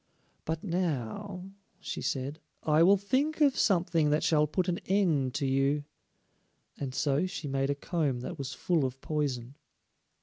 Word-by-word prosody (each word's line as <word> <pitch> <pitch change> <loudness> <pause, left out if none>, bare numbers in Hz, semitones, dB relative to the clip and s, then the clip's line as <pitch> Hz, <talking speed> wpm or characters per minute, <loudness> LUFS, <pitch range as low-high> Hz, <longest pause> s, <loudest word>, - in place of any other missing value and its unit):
"But 160 0 -3
now," 180 - -3 0.3
she - - -5
said, 140 +3 -2 0.2
"I 155 0 +4
will 195 +4 +7
think 270 +11 0
of 285 -3 +4
something 170 -5 +2
that 150 +1 +2
shall 150 -2 +3
put 180 +4 -1
an 175 -1 0
end 165 -10 +2
to 140 - 0
you," 135 +2 +2 1.0
and 135 -2 -4
so 145 +6 +1
she 165 -4 -5
made 135 0 0
a 140 - +1
comb 140 -4 -1
that 125 - -6
was 135 -1 -4
full 160 +4 0
of 130 0 -3
poison. 135 -5 -2
150 Hz, 160 wpm, -30 LUFS, 135-180 Hz, 1.0 s, will